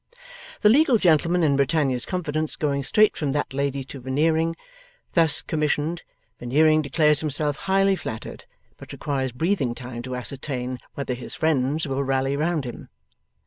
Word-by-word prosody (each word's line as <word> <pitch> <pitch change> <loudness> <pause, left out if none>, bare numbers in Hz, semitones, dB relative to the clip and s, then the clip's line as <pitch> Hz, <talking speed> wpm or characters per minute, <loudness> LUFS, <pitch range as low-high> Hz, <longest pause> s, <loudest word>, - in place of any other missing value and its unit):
The 210 - +6
legal 270 +1 +5
gentleman 170 -1 +3
in 145 -3 +3
Britannia's 140 -3 +1
confidence 155 -4 -2
going 140 -2 -1
straight 215 +9 +3
from 145 -3 -2
that 145 -1 -2
lady 140 0 -1
to 135 +1 -10
Veneering, 160 +6 +1 0.6
thus 165 -4 +3
commissioned, 155 +1 -1 0.4
Veneering 155 +5 +3
declares 150 +1 +3
himself 150 -1 -1
highly 195 0 +4
flattered, 120 -10 -7 0.3
but - - -12
requires 135 -3 -2
breathing 135 - 0
time 120 -1 -7
to 125 +1 -5
ascertain 125 0 -4 0.2
'whether 140 -2 -3
his 125 0 -6
friends 150 0 +1
will 135 0 -1
rally 135 0 0
round 155 -1 -1
him. 120 - -8
145 Hz, 145 wpm, -24 LUFS, 130-160 Hz, 0.6 s, The